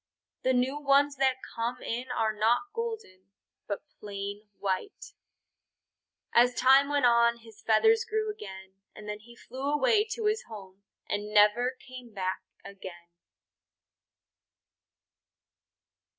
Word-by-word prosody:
The 260 - +2
new 260 +3 +1
ones 280 0 +3
that 265 -1 +3 0.2
come 235 +2 -2
in 245 +3 -3
are 225 -3 0
not 220 +3 +2
golden, 445 - -6 0.4
but 200 - -4 0.2
plain 205 0 -6
white. 195 - -4 1.2
As 245 +1 +5
time 270 +2 +5
went 285 -3 +2
on 235 0 +4
his 220 -1 -16
feathers 445 - +4
grew 435 -2 -2
again, 190 - -11 0.2
and 210 - -11
then 210 0 -5
he 235 +2 -16
flew 265 +4 -5
away 425 +8 +3
to 450 - -4
his 430 +2 0
home 195 -3 -11 0.2
and 205 +1 -3
never 215 +5 +4
came 250 -3 -11
back 185 -1 -2 0.2
again. 185 -3 -11
235 Hz, 120 wpm, -29 LUFS, 205-275 Hz, 1.2 s, As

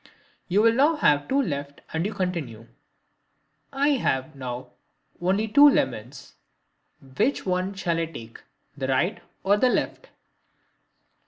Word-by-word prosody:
You 200 +4 +2
will 230 0 +5
now 290 +7 +3
have 145 - +2
two 275 - +1
left 145 - -3
and 160 +1 0
you - - -4
continue: 160 - -3 1.1
"I 280 +1 +1
have 155 - 0
now 125 -1 -6 0.5
only 195 +5 +1
two 285 +7 +7
lemons. 125 - -2 0.8
Which 275 - +1
one 185 +1 -1
shall 170 -3 -1
I 165 - -1
take, 115 -8 -11 0.3
the 135 -2 -3
right 135 +9 0 0.2
or 200 +2 +3
the 255 +4 +3
left?" - - -2
180 Hz, 135 wpm, -25 LUFS, 135-225 Hz, 1.1 s, two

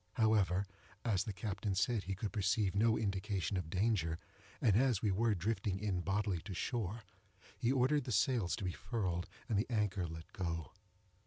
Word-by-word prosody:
However, 100 -4 +3 0.4
as 105 -4 +2
the 110 - -2
captain 100 -1 -2
said 105 +1 +1
he 95 +1 -2
could 100 +2 -3
perceive 100 -1 +2
no 110 +3 +3
indication 100 -1 -1
of 90 -4 -2
danger, 90 -4 +1 0.4
and 105 -5 +4
as 125 -3 +3
we 105 - +3
were 110 +2 +2
drifting 95 +1 -1
in 95 -3 -1
bodily 95 -1 0
to 95 0 -6
shore, 110 +2 -2 0.5
he 120 - +1
ordered 135 +1 +3
the 125 - -3
sails 110 -2 +2
to - - -6
be 90 - 0
furled, 90 -6 -2 0.2
and 110 -5 +2
the 110 - -1
anchor 105 -6 0
let 80 0 -9
go. 85 -4 -3
100 Hz, 175 wpm, -36 LUFS, 95-110 Hz, 0.5 s, and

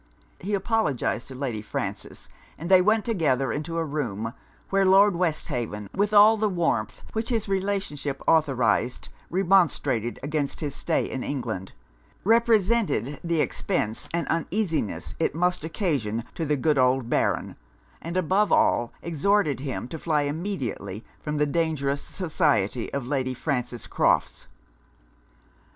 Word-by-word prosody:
He 205 +3 -1
apologized 200 - 0
to 130 - -9
Lady 125 -5 -3
Frances, 65 - -5 0.3
and 170 +4 -5
they 185 -1 +8
went 215 +3 +2
together 150 - +1
into 155 +3 -3
a 165 - 0
room; 115 -7 -3 0.4
where 195 0 +3
Lord 195 +1 +6
Westhaven, 125 - -2
with 205 +1 +1
all 215 +1 +7
the 215 0 +1
warmth 165 - -1
which 220 +2 -1
his 225 -4 0
relationship 190 -8 -2
authorized, 130 -6 +2 0.2
remonstrated 170 - +2
against 145 -1 -1
his 145 -3 -3
stay - - 0
in 130 - -4
England; 110 -9 -4 0.5
represented 220 - +2
the 170 -2 +1
expence 115 - -1
and 170 0 -1
uneasiness 165 - -1
it - - 0
must 180 -1 +1
occasion 145 - -1
to 165 - -3
the 150 0 +1
good 150 +1 +2
old 130 -1 +3
Baron; - - 0 0.5
and 170 +2 -4
above 190 +4 +2
all, 120 0 +3
exhorted 170 - +1
him 130 -3 -4
to 160 - -6
fly 150 -2 +1
immediately 145 - -4 0.2
from 150 0 -3
the 150 - +3
dangerous 145 -3 0
society 145 - 0
of 140 -3 -3
Lady 130 -1 -1
Frances 125 -4 -3
Crofts. - - +1
150 Hz, 135 wpm, -25 LUFS, 130-190 Hz, 0.5 s, they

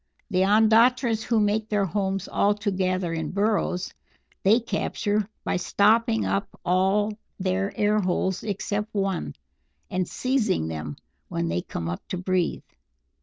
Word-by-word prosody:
The 185 -1 +2
Ondatras 225 +3 +4
who 230 -1 +1
make 215 +1 +1
their 205 -2 +2
homes 195 +1 -2
altogether 190 -4 0
in 160 -2 -2
burrows, 200 -3 0 0.5
they 215 +5 +5
capture 210 -3 -1
by - - 0
stopping 225 +5 +3
up 200 - 0 0.2
all 195 +4 +2 0.2
their 190 +1 0
air 210 0 +3
holes 185 -1 0
except 210 +1 -3
one, 195 - -1 0.6
and 185 -1 0
seizing 230 - 0
them 75 -2 -5 0.3
when 85 0 -2
they 85 +1 0
come 85 -1 -5
up 85 +1 -4
to 185 - -3
breathe. 185 -1 0
200 Hz, 130 wpm, -25 LUFS, 185-215 Hz, 0.6 s, they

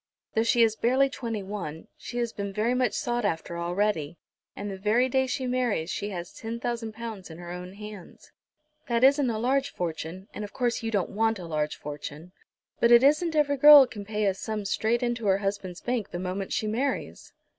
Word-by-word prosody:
Though 220 - +2
she 230 +1 +4
is 220 -1 +3
barely 260 +4 +3
twenty 230 -6 -4
one, 185 -6 -6
she 240 - -8
has 235 -1 -1
been 200 -1 -4
very 215 +4 0
much 250 -1 +1
sought 240 0 -1
after 170 -3 -2
already, 175 -3 -1 0.4
and 205 0 -5
the 190 - -6
very 220 +6 +3
day 265 +1 +1
she 260 +1 -2
marries 245 -9 0
she 205 - -3
has 175 -3 -6
ten 230 +1 -6
thousand 235 -2 -3
pounds 220 -5 -7
in 160 - -10
her 175 0 -8
own 180 +1 -7
hands. 210 -2 -11 0.6
That 235 0 +1
isn't 275 -1 +5
a 225 - -1
large 270 +4 +1
fortune, 170 +2 -5
and 210 - -5
of 205 - -8
course 245 -1 0
you 225 - -2
don't 205 -5 -1
want 225 +1 +1
a 180 - -8
large 155 -2 -2
fortune, 150 +3 -8 0.5
but 235 - +4
it 240 +1 +8
isn't 310 +4 +3
every 285 -2 +2
girl 290 0 +10
can 215 -4 -8
pay 210 +1 -2
such 195 - +4
a 190 - -10
sum 215 -2 -3
straight 225 +4 0
into 240 -3 -1
her 190 -1 +4
husband's 195 -3 -4
bank 240 -4 -2
the - - -5
moment 185 +2 -4
she - - 0
marries!" 245 +6 -2
215 Hz, 210 wpm, -27 LUFS, 190-240 Hz, 0.6 s, girl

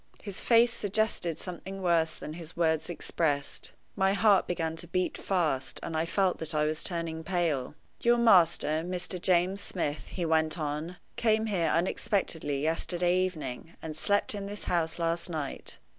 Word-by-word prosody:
His 200 -3 -6
face 235 0 +5
suggested 205 -6 0
something 190 +2 -6
worse 170 -3 +2
than 150 - -7
his 165 -1 -8
words 160 -1 +1
expressed. 145 -4 -2 0.2
My 190 0 +3
heart 205 -1 +4
began 165 -2 -1
to 175 - -5
beat 185 +2 -1
fast, 155 -9 -1
and 165 - -4
I 160 +1 0
felt 190 +1 +1
that 160 0 -1
I 150 0 +3
was 155 0 -2
turning 165 -2 -3
pale. 160 -7 -1 0.2
"Your 240 0 +4
master, 170 -8 +5
Mr. 180 0 -4
James 185 +2 +2
Smith," 150 -5 -3
he 175 - -3
went 160 0 +2
on, 155 +3 -3 0.2
"came 220 -1 +2
here 190 -6 +1
unexpectedly 165 -5 0
yesterday 175 +2 +1
evening, 165 -4 -3
and 160 -1 -6
slept 205 +7 +2
in 200 -1 -4
this 205 +1 -7
house 165 -2 0
last 170 +1 -1
night. 155 -5 -4
170 Hz, 160 wpm, -29 LUFS, 160-190 Hz, 0.2 s, face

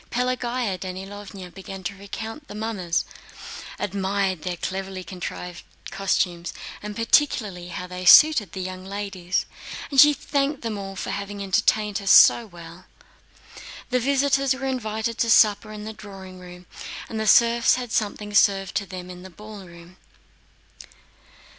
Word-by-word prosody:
Pelagéya 245 -4 -1
Danílovna 190 0 -8
began 195 0 -9
to 175 - -3
recognize 220 +6 -7
the - - -9
mummers, 210 -6 -2 0.7
admired 195 -2 -1
their 180 0 -4
cleverly 190 +1 -4
contrived 180 0 -7 0.3
costumes, 180 -3 -1 0.3
and 210 0 -6
particularly 220 - +1
how 180 +1 -6
they 180 0 -7
suited 225 - +7
the 190 - -4
young 185 0 -6
ladies, 190 -2 -3 0.5
and 275 -2 +8
she 295 - +8
thanked 285 -1 -1
them 225 -2 -3
all 195 -1 -6
for - - -4
having 200 0 -5
entertained 210 +1 +1
her 200 - -9
so 230 +4 +7
well. 170 -1 -12 1.1
The 250 - +3
visitors 275 +1 +2
were 270 0 -5
invited 225 -3 -2
to 230 - +1
supper 215 -1 +4
in 210 -1 -8
the 220 - -6
drawing 190 -3 -11
room, 180 0 -12 0.4
and 220 - -5
the 220 - -1
serfs 235 +2 +5
had 245 -3 -5
something 210 -1 -2
served 195 -2 +3
to 200 - -3
them 180 -1 -8
in 180 0 -10
the 190 - -10
ballroom. 185 -3 -12
200 Hz, 145 wpm, -24 LUFS, 185-225 Hz, 1.1 s, and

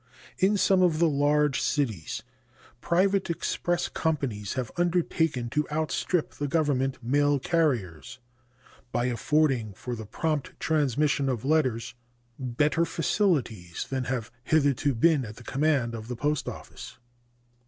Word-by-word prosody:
In 200 +2 +3
some 190 -1 +4
of 175 -4 +3
the 170 +1 +4
large 145 -1 +2
cities 110 - -1 0.6
private 190 +2 +2
express 175 +1 -1
companies 135 - -2
have 125 -3 -3
undertaken 165 -7 +1
to 150 +2 0
outstrip 160 +2 0
the 145 - -4
Government 135 -4 +1
mail 145 +4 +2
carriers 130 - -1 0.7
by 120 +1 0
affording 125 -2 +1
for 125 +2 -5
the 110 -2 -8
prompt 155 +4 -2
transmission 145 -2 +1
of 125 -2 -2
letters 130 -6 +1 0.5
better 145 +6 +1
facilities 140 - 0
than 130 -2 -1
have 125 -3 -3
hitherto 145 -2 +2
been 150 +3 +3
at 110 -2 -8
the 125 - -13
command 135 -2 +1
of 110 -1 -7
the 125 - -4
Post 145 +3 -1
Office. - - -10
145 Hz, 130 wpm, -27 LUFS, 120-160 Hz, 0.7 s, some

